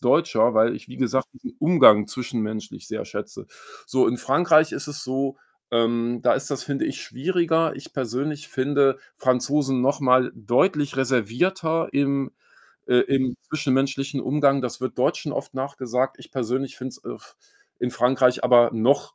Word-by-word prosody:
Deutscher, 125 -4 +3
weil 110 +1 +3
ich, - - -13
wie 125 - -12
gesagt, 130 +1 0
diesen 255 - -10
Umgang 135 - +6
zwischenmenschlich 110 -2 -5
sehr - - -5
schätze. - - -8 0.4
So, 130 - +2
in 120 +2 0
Frankreich 155 +3 +3
ist - - -4
es 145 0 -6
so, 135 +1 -2 0.3
ähm, 115 0 0
da - - +4
ist 135 - -3
das, 140 - -2
finde 140 -1 -2
ich, - - -5
schwieriger. 165 +1 0
Ich 135 - -12
persönlich 140 +4 -3
finde 135 0 +1 0.2
Franzosen 135 +1 +1
noch 135 +4 +1
mal 130 -1 +3
deutlich 145 - +1
reservierter 160 - 0
im 140 -1 0 0.6
äh, 125 - +2
im 130 -2 0
zwischenmenschlichen 135 -1 -1
Umgang. 140 +1 +2
Das 125 0 -5
wird 130 - -4
Deutschen - - 0
oft - - -5
nachgesagt. 130 -1 -2
Ich - - -15
persönlich 130 +1 -3
finde 130 - -6
es, - - -12
äh, - - -6
f - - -17 0.4
in 125 - -2
Frankreich 125 +1 +2
aber 120 -1 +6
noch 120 +6 +1
130 Hz, 160 wpm, -23 LUFS, 125-145 Hz, 0.6 s, Umgang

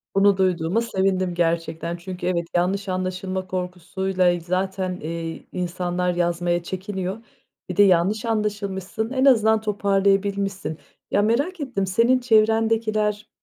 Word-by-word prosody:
Bunu 195 0 +5
duyduğuma 185 +2 +1
sevindim 190 -4 0
gerçekten. 170 0 -1
Çünkü 180 0 -6
evet, 170 -2 0
yanlış 190 +3 0
anlaşılma 185 0 -3
korkusuyla 180 0 -1
zaten, 185 +2 -2
ııı, 165 -1 -5
insanlar 180 0 -1
yazmaya 175 0 0
çekiniyor, 190 +1 -4 0.5
bir 180 - -5
de 205 - +8
yanlış 190 +4 +3
anlaşılmışsın, 210 -1 -2
en 265 0 +1
azından 220 -4 +5
toparlayabilmişsin. 200 -3 0 0.3
Ya, 205 - +3
merak 285 - 0
ettim, 235 -9 -2
senin 235 +7 +3
çevrendekiler 220 -2 +2
190 Hz, 115 wpm, -23 LUFS, 180-210 Hz, 0.5 s, de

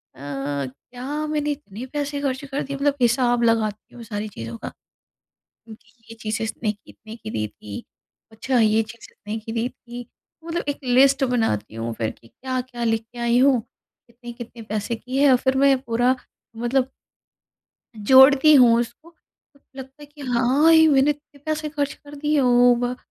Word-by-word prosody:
अ, - - -18
क्या 145 - -5
मैंने 300 -1 -1
इतने 255 -5 -7
पैसे 290 -1 -2
ख़र्च 275 0 -2
कर 275 +1 -3
दिए 275 0 -5
मतलब 280 0 +1
हिसाब 240 0 +2
लगाती 220 -2 0
हूँ 235 - -10
सारी 210 0 -5
चीज़ों 115 - -7
का। - - -5 1.0
ये 225 +1 -15
चीज़ें 220 +1 -2
इसने 220 -1 -2
कितने 215 +1 -14
की 215 -1 -8
दी 105 - -2
थी? 105 0 -10 0.5
अच्छा 245 +3 -1
ये 220 0 +3
चीज़ 225 +2 -12
इतने 210 +2 -7
की 225 +1 -7
दी 230 +2 -1
थी। 240 -1 -11 0.4
मतलब 335 +1 -3
एक 285 - -2
लिस्ट 270 +2 +4
बनाती 225 - -1
हूँ 115 +1 -4
फ़िर 110 -1 -2
कि 115 - -16
क्या-क्या 255 - -5
लेके 225 +1 -2
आई 235 0 +2
हूँ। 260 -2 +4
कितने-कितने 235 +1 -13
पैसे 215 +1 -3
की 255 +4 -5
है? 280 -1 +5
और 255 - +6
फिर 265 +1 0
मैं 275 0 +5
पूरा 245 +1 +1 0.4
मतलब 255 +3 0 1.2
जोड़ती 270 +3 +8
हूँ 235 -3 +6
उसको 310 +8 -8 0.6
लगता 265 +2 -11
है - - -10
कि 290 0 -18
हाँ, 260 +5 +3
ये 320 0 +7
मैंने 275 0 +4
इतने 290 -1 -8
पैसे 310 0 -2
खर्च 290 -2 -2
कर 290 0 -14
दिए 295 0 +1
ओ 245 -1 +5
भ 245 +1 -2
245 Hz, 170 wpm, -22 LUFS, 225-275 Hz, 1.2 s, जोड़ती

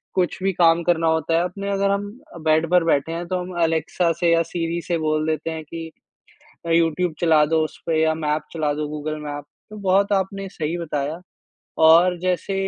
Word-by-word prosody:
कुछ 180 -2 0
भी 195 0 +1
काम 170 -1 +4
करना 165 -1 +1
होता 160 0 +1
है, 170 - +2
अपने 195 +3 -4
अगर 200 0 +1
हम 200 +1 -1 0.3
अ, - - -8
बेड 160 0 +2
पर 180 -1 +5
बैठे 160 -1 +1
हैं 170 +1 -5
तो 185 0 -1
हम 180 +1 -7
अलेक्सा 165 +1 +1
से 170 -1 +3
या 165 0 +3
सिरी 170 0 -2
से 175 - 0
बोल 155 0 0
देते 160 +1 -2
हैं 160 -1 -6
कि 165 +1 -8 0.8
अ, - - -3
यूट्यूब 165 +1 +2
चला 160 -3 +4
दो 160 +1 +1
उस 155 - -8
पे 160 -1 +1
या 160 0 +2
मैप 155 -1 -1
चला 155 -3 0
दो 150 0 -3
गूगल 150 +1 -4
मैप 145 -1 -5 0.3
तो 215 - -9
बहुत 200 +2 +3
आपने 195 0 -1
सही 160 -2 -3
बताया 150 -1 -3 0.6
और 170 +3 +6
जैसे 185 +2 -1
165 Hz, 210 wpm, -22 LUFS, 155-180 Hz, 0.8 s, और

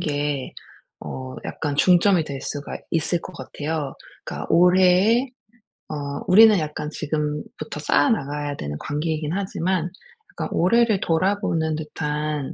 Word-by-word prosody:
게 145 -3 -2 0.5
어 130 0 -6
약간 145 -2 -3
중점이 180 +1 +4
될 140 -2 -6
수가 145 +1 -5
있을 165 +1 0
것 185 - -10
같아요. 150 -3 -4 0.3
그러니까 - - -5
올해에 185 +7 +4 0.6
어 - - -4 0.3
우리는 215 +1 +7
약간 150 0 -4
지금부터 150 0 -4
쌓아나가야 145 - +1
되는 75 0 -5
관계이긴 155 +1 -2
하지만 185 -2 -1 0.4
그러니까 - - -5
올해를 220 +3 +3
돌아보는 165 -2 0
듯한 150 -2 -3
155 Hz, 285 characters per minute, -23 LUFS, 150-185 Hz, 0.6 s, 우리는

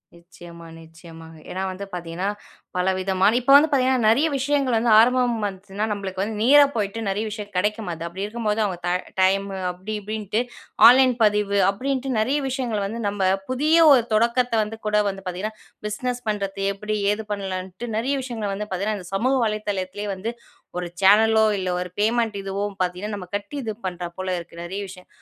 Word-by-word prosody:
நிச்சயமா, 170 0 -13 0.2
நிச்சயமாங்க. 165 0 -13
ஏன்னா 185 - -4
வந்து 200 +2 -7
பார்த்தீங்கன்னா 175 +2 -3 0.5
பலவிதமான 190 +4 +2
இப்ப 255 +2 +1
வந்து 290 +2 +7
பார்த்தீங்கன்னா 260 -3 +2
நெறைய 275 +8 +4
விஷயங்கள் 275 -2 +1
வந்து 230 +1 +2
ஆரம்பம் 245 +1 +4
வந்துச்சுன்னா 195 +2 -4
நம்பளுக்கு 195 -2 -4
வந்து 210 +1 -3
நேரா 285 +5 +7
போயிட்டு 210 0 -2
நெறைய 205 +3 -1
விஷயம் 210 -1 -7
கெடைக்கமாட்டேங்குது. 185 -3 -1
அப்படி 185 +4 -6
இருக்கும்போது 215 0 -2
அவங்க 185 -3 -3
த - - 0 0.3
டைம் 195 +1 +3 0.2
அப்படி 190 +4 -7
இப்படின்ட்டு, 215 +1 -2 0.5
ஆன்லைன் 255 +1 +6
பதிவு 210 -1 +2
அப்படின்ட்டு 260 +5 -2
நெறைய 260 +7 +1
விஷயங்கள் 240 -6 -2
வந்து 225 +4 -5
நம்ம 200 -1 -3 0.3
புதிய 300 +6 +2
ஒரு 255 -4 +6
தொடக்கத்தை 235 +2 +2
வந்து 215 +1 -7
கூட 210 - 0
வந்து 195 0 -7
பார்த்தீங்கன்னா, 185 +4 -4 0.3
பிஸ்னஸ் 245 +3 -3
பண்ணுறது 200 -2 -2
எப்படி, 210 +2 -4 0.2
ஏது 220 +1 -5
பண்ணலான்ட்டு 190 +2 -4
நெறைய 265 +5 0
விஷயங்களை 230 -5 -4
வந்து 210 +2 -4
பார்த்தீங்கன்னா, 200 +3 -2
இந்த 180 - -11
சமூக 255 +7 +2
வலைதளத்திலேயே 205 -1 -3
வந்து 195 +5 -4 0.5
ஒரு 180 -1 -3
சேனலோ 220 +3 +5
இல்லை 185 -1 -2
ஒரு 180 - -5
பேமெண்ட் 225 0 +1
இதுவோ 195 +1 -3 0.2
பார்த்தீங்கன்னா 185 +4 -2
நம்ம 185 -3 -8
கட்டி 205 +8 -5
இது 225 -3 -3
பண்றா 180 -1 -4
போல 185 0 -2
இருக்கு 170 0 -11
நெறைய 185 +3 -5
விஷயம். 180 -1 -12
210 Hz, 165 wpm, -23 LUFS, 185-230 Hz, 0.5 s, வந்து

